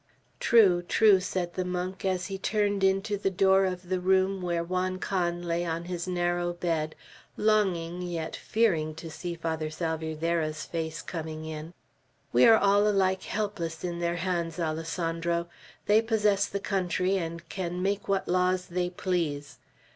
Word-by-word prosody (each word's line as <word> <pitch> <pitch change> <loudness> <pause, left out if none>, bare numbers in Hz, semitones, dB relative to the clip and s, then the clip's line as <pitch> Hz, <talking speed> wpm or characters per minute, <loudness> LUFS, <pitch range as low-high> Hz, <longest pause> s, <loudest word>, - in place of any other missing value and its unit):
"True, 195 -7 +5
true!" 200 +2 +5
said 180 -1 -3
the 185 - -1
monk, 180 +1 -4
as 185 -1 0
he 195 -1 -5
turned 205 -1 0
into 195 +2 +2
the 195 - 0
door 190 +1 +4
of 180 -1 -4
the 185 -1 +1
room 190 +1 +2
where 170 -1 -1
Juan 185 +1 -1
Can 175 -2 -1
lay 170 0 -1
on 170 0 -3
his 175 0 -4
narrow 175 -1 0
bed, 165 -3 -2 0.4
longing 185 -5 +1
yet 170 -3 -4
fearing 165 -9 +1
to 160 0 -8
see 170 +2 -5
Father 160 -2 -3
Salvierderra's 160 0 -2
face 160 -1 -4
coming 160 -2 -5
in. 160 +2 -7 0.6
"We 125 +1 +7
are 225 - +8
all 205 0 +4
alike 190 -2 +2
helpless 180 -6 -3
in 175 -1 -3
their 170 0 0
hands, 170 -2 -2
Alessandro. 165 +1 -1 0.4
They 210 +2 +5
possess 210 -3 +2
the 200 - -3
country, 190 -1 0
and 170 -1 -5
can 180 0 -4
make 200 +1 -1
what 195 -1 0
laws 180 0 +1
they 180 0 -1
please. 165 -6 -2
180 Hz, 155 wpm, -28 LUFS, 165-190 Hz, 0.6 s, are